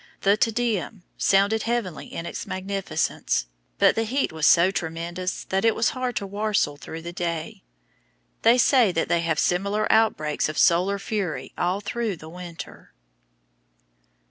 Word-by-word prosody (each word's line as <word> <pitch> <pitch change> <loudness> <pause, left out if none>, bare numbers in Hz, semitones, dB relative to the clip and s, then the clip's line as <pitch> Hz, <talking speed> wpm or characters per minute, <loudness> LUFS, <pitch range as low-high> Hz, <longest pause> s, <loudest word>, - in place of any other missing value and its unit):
The 200 +1 +4
"Te 220 - +2
Deum" 225 -4 -2
sounded 200 +3 +3
heavenly 225 -9 -3
in 165 - -5
its - - -6
magnificence; 190 - -2 0.3
but 200 -1 +5
the 225 - 0
heat 260 +5 -1
was 160 -1 +1
so 175 +2 +6
tremendous 170 +1 -4
that 190 0 0
it 225 -1 +3
was 225 - +2
hard 255 -2 -3
to 200 - -2
"warstle" 205 -6 0
through 160 +2 -9
the 170 +1 -6
day. 170 -3 -4 0.8
They 235 +2 +5
say 245 -4 +4
that 165 - -1
they 170 - +2
have 165 -2 0
similar 200 +6 +1
outbreaks 155 -11 +2
of 155 - -6
solar 185 +3 +3
fury 195 -5 -3
all 180 +3 -1
through 215 0 -2
the 160 0 -11
winter. 175 -1 -10
195 Hz, 155 wpm, -24 LUFS, 170-220 Hz, 0.8 s, so